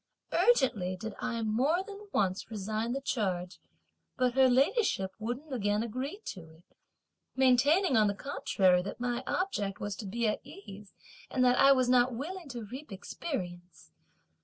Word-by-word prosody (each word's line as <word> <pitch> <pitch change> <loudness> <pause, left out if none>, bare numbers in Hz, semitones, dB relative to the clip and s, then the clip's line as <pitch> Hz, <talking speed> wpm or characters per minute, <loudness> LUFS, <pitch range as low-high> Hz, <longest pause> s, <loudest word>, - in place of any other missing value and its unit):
Urgently 215 - +3
did 220 +3 -6
I 230 -2 -2
more 265 - +1
than 405 +1 -10
once 190 - 0
resign 220 +2 -2
the 275 - -3
charge, 185 -8 -2 0.6
but 250 -2 +2
her 265 0 +5
ladyship 265 - +2
wouldn't 245 +7 -5
again 205 -2 0
agree 260 - -5
to 165 -5 -7
it; 160 +2 -19 0.7
maintaining, 265 +6 +4
on 215 -1 +5
the 200 - -1
contrary, 190 -7 +2
that 195 - -7
my 245 0 -2
object 210 - -1
was 205 -1 -3
to 210 - -6
be 230 +3 -1
at 210 - -1
ease, 205 - -12 0.3
and 255 -1 +2
that 250 0 +4
I 275 0 +7
was 255 -2 +2
not 250 0 +3
willing 335 +5 -6
to 240 -4 -6
reap 260 +5 -9
experience. 180 - -6
240 Hz, 160 wpm, -30 LUFS, 200-270 Hz, 0.7 s, I